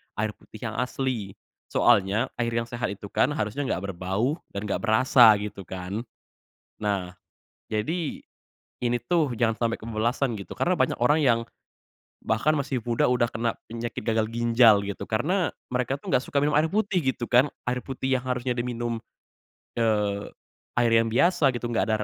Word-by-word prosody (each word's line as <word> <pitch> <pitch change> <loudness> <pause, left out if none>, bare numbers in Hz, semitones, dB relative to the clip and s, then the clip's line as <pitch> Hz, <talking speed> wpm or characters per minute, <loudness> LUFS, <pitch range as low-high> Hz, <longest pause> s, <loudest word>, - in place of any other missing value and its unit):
air 105 +1 -1
putih 110 +2 -8
yang - - -9
asli. 125 -6 -2 0.3
Soalnya 105 +6 +3
air 115 0 0
yang 115 - +1
sehat 120 +1 -3
itu 100 0 -11
kan - - +3
harusnya 120 +3 -2
nggak 100 -3 -2
berbau 100 - -1 0.2
dan 100 - -3
nggak 105 - -1
berasa 115 0 +6
gitu 100 -3 -7
kan. 95 +3 -5 0.8
Nah 95 -4 -2 0.5
jadi 150 +10 -2 0.6
ini 120 0 +2
tuh 150 +1 +1
jangan 115 -1 +1
sampai 115 0 -1
kebablasan 115 +3 -1
gitu 100 - -8
karena 180 +1 +1
banyak 130 - 0
orang 145 +6 +4
yang 115 -3 +4 0.8
bahkan 110 +7 +1
masih 135 -5 -2
muda 120 0 +1
udah 125 -1 +2
kena 115 0 -1 0.2
penyakit 115 0 -5
gagal 110 0 +1
ginjal, 115 -3 +5
gitu. 100 0 -5
Karena 170 - 0 0.2
mereka 125 +1 -1
tuh 140 - -9
nggak 130 - +2
suka 140 - 0
minum 150 0 +2
air 155 - +4
putih 200 0 +1
gitu 120 - -6
kan, 125 +3 +5 0.2
air 125 0 -1
putih 130 0 -1
yang 125 - -8
harusnya 125 0 -1
diminum, 120 -1 -2 0.8
eee, 105 -3 0 0.5
air 120 -1 +3
yang 115 0 +4
biasa 150 +4 +3
gitu, 120 - -6
nggak 120 - +1
ada 110 - +3
115 Hz, 165 wpm, -26 LUFS, 110-130 Hz, 0.8 s, berasa